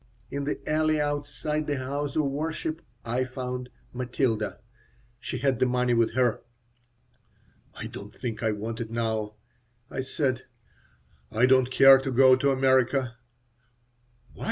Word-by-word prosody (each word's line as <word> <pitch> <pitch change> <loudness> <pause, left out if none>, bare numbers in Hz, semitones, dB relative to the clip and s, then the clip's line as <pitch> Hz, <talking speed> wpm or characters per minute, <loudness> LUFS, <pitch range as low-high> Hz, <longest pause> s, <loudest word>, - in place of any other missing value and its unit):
In 140 0 -3
the 145 - -1
alley 155 0 +2
outside 150 +1 -2
the 145 -1 0
house 140 +2 -3
of 155 - +2
worship 155 +3 -3 0.2
I 120 +2 0
found 125 -1 -5 0.2
Matilda. 120 -3 -1 0.6
She - - -4
had 135 -3 +1
the 130 - +3
money 125 0 +1
with 115 -1 +2
her 125 -3 +2 1.3
"I - - -6
don't - - -8
think 120 -4 -5
I 110 -1 +1
want 110 +2 -4
it 115 - -5
now," 110 -2 -2 0.6
I - - -4
said. 130 -1 -1 0.9
"I 115 +3 +3
don't 130 -1 +4
care 135 +1 +8
to 135 0 -3
go 130 0 +6
to 140 +2 +1
America." 130 -2 +2 1.2
"Why?" - - -17
130 Hz, 140 wpm, -27 LUFS, 120-140 Hz, 1.3 s, care